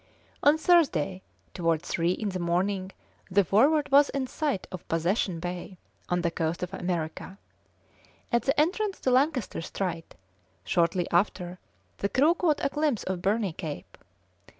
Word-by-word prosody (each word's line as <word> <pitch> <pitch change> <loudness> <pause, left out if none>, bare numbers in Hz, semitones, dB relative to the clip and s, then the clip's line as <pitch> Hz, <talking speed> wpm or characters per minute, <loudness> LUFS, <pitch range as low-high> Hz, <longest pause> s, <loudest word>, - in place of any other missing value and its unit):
On 290 +2 +5
Thursday, 270 - +2 0.3
towards 165 -2 0
three 170 +1 +1
in 210 +2 -3
the 185 -1 -4
morning, 185 +2 -1 0.4
the 200 +2 +4
Forward 280 - +3
was 285 +1 +6
in 275 -1 -2
sight 280 -6 -2
of 185 -2 -8
Possession 170 +2 0
Bay, 180 +2 -6 0.3
on 175 0 +1
the 170 -1 0
coast 165 +1 -2
of 180 +1 -5
America. 175 0 -4 0.9
At 235 - +3
the 275 +2 +1
entrance 385 +6 +1
to 260 - +1
Lancaster 260 - +1
Strait, 170 -1 -4 0.5
shortly 170 - +1
after, 180 0 0 0.4
the 200 - 0
crew 290 +8 +4
caught 335 -4 0
a - - +2
glimpse 295 -5 0
of 185 -1 -3
Burney 200 -1 0
Cape. 150 - -7
190 Hz, 150 wpm, -27 LUFS, 175-275 Hz, 0.9 s, was